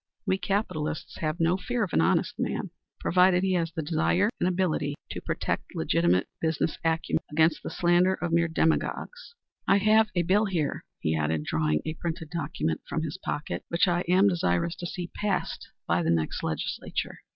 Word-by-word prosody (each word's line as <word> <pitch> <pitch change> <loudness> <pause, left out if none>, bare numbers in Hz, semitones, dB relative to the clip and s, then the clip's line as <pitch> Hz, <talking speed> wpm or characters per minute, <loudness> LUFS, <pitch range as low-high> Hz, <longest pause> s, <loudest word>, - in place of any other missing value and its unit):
We 190 - +1
capitalists 175 -8 -2
have 155 0 -2
no 165 +2 +3
fear 235 +5 -1
of 190 - -4
an - - +4
honest 80 - +2
man, - - -2 0.3
provided 180 0 +4
he 190 -1 +2
has 165 -2 0
the 160 0 -4
desire 175 +6 +2
and - - +2
the - - +2
ability 170 -6 0 0.2
to - - -5
protect - - -3
legitimate 85 +2 +2
business 160 0 0
acumen 165 0 0
against 160 +1 +3
the - - -5
slander 175 +2 +3
of 175 -2 -3
mere 170 0 +3
demagogues. 470 - -1 0.3
I 195 - +5
have 215 +2 +4
a 175 - +2
bill 200 +5 +3
here," 170 -7 -1 0.2
he 80 - +1
added, 80 0 0
drawing 75 0 0
a 155 - -2
printed 165 -1 -5
document 145 - -2
from 160 - -1
his 160 +3 -5
pocket, 150 - -3
"which 170 +3 +2
I 175 0 +2
am 185 +3 +5
desirous 165 - +1
to 175 - -4
see 175 -1 -5
passed 205 -3 -2 0.2
by 85 - +2
the 80 - 0
next 80 -2 0
legislature. 80 - -3
170 Hz, 185 wpm, -27 LUFS, 150-185 Hz, 0.3 s, I